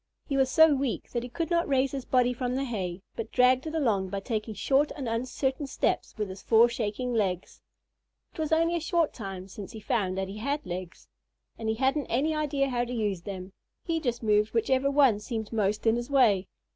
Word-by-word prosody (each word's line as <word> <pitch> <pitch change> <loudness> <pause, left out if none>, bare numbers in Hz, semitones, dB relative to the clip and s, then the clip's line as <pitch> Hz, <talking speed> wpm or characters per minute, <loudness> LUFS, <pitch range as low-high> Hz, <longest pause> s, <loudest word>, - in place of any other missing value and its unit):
He 280 - -2
was 265 -1 +3
so 320 +1 +6
weak 270 -3 -2
that 240 - -1
he 245 - -7
could 330 +7 -3
not 340 0 +2
raise 270 -1 +2
his 270 -2 -5
body 250 -1 +3
from 250 0 -2
the 270 - 0
hay, 190 -7 -4
but 225 - -5
dragged 255 +3 +4
it 315 - -4
along 210 -11 +1
by 200 +1 -3
taking 215 0 -3
short 280 +6 +2
and 275 -5 -5
uncertain 255 +4 -2
steps - - -1
with 210 -1 -1
his 190 +1 -8
four 230 +1 +5
shaking 235 +2 -2
legs. 190 -5 -1 0.7
It - - -13
was 310 -1 -1
only 330 +2 +3
a - - +1
short 330 0 +1
time 195 -4 -7
since 195 0 -9
he 220 - -7
found 195 -4 -1
that 190 0 -1
he 195 +2 -7
had 285 +5 -2
legs, 180 0 -7 0.5
and 220 -1 -4
he 220 - +1
hadn't 270 +4 +1
any 285 +7 +1
idea 290 -3 0
how 240 -1 0
to 245 - -5
use 210 -7 -1
them. 190 0 -7 0.3
He 330 -2 -1
just 245 -6 -2
moved 210 +1 +2
whichever 260 +4 +2
one 275 -7 +4
seemed 220 0 -5
most 210 0 0
in 225 +1 +4
his 240 +2 -4
way. 220 -9 +4
240 Hz, 220 wpm, -28 LUFS, 210-275 Hz, 0.7 s, so